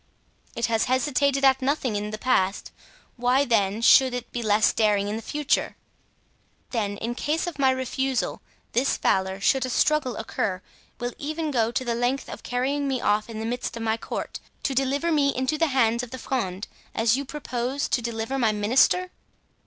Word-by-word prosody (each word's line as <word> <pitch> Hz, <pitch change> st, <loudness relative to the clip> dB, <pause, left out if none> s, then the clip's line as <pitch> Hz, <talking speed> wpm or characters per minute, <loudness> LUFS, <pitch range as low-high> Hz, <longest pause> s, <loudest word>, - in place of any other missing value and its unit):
"It 235 Hz, -, 0 dB
has 225 Hz, -1 st, +1 dB
hesitated 275 Hz, +1 st, +1 dB
at 265 Hz, 0 st, +4 dB
nothing 260 Hz, -4 st, 0 dB
in 205 Hz, +1 st, -2 dB
the 215 Hz, -, -5 dB
past; 205 Hz, -5 st, 0 dB, 0.5 s
why, 250 Hz, +3 st, +3 dB
then, 215 Hz, -2 st, +1 dB
should 255 Hz, +1 st, +6 dB
it 245 Hz, -, -6 dB
be 240 Hz, -, -3 dB
less 215 Hz, -1 st, +3 dB
daring 210 Hz, -2 st, +2 dB
in 210 Hz, -, -2 dB
the 225 Hz, -, -4 dB
future?" 295 Hz, +5 st, -1 dB, 1.0 s
"Then, 205 Hz, -4 st, -1 dB
in 230 Hz, +3 st, -3 dB
case 300 Hz, +7 st, -1 dB
of 345 Hz, -4 st, -6 dB
my 265 Hz, -1 st, +4 dB
refusal, 260 Hz, 0 st, -1 dB, 0.3 s
this 255 Hz, +3 st, +1 dB
valor, 190 Hz, 0 st, +1 dB
should 265 Hz, +6 st, +2 dB
a 255 Hz, -, -2 dB
struggle 270 Hz, -1 st, +1 dB
occur, 195 Hz, -4 st, -2 dB, 0.4 s
will 245 Hz, 0 st, -3 dB
even 310 Hz, +1 st, -3 dB
go 230 Hz, -4 st, +2 dB
the 240 Hz, -1 st, -1 dB
length 245 Hz, +3 st, -1 dB
of -, -, -8 dB
carrying 275 Hz, +3 st, -1 dB
me 265 Hz, -2 st, 0 dB
off 210 Hz, +1 st, +1 dB
in 220 Hz, -1 st, -6 dB
the 220 Hz, -, -3 dB
midst 245 Hz, 0 st, -3 dB
of 230 Hz, -, -5 dB
my 220 Hz, 0 st, +1 dB
court, 230 Hz, -, -5 dB, 0.2 s
to 275 Hz, -, 0 dB
deliver 275 Hz, +5 st, 0 dB
me 285 Hz, -3 st, +2 dB
into 260 Hz, +4 st, 0 dB
the 325 Hz, +2 st, +2 dB
hands 235 Hz, -4 st, +2 dB
of 245 Hz, -, -7 dB
the 260 Hz, -, -7 dB
Fronde, 205 Hz, -8 st, -3 dB, 0.3 s
as 225 Hz, +1 st, +3 dB
you 275 Hz, -, -2 dB
propose 265 Hz, -1 st, -3 dB
to 245 Hz, -, +1 dB
deliver 235 Hz, +3 st, -3 dB
my 225 Hz, -4 st, +3 dB
minister?" 255 Hz, -, +3 dB
245 Hz, 185 wpm, -25 LUFS, 225-270 Hz, 1.0 s, should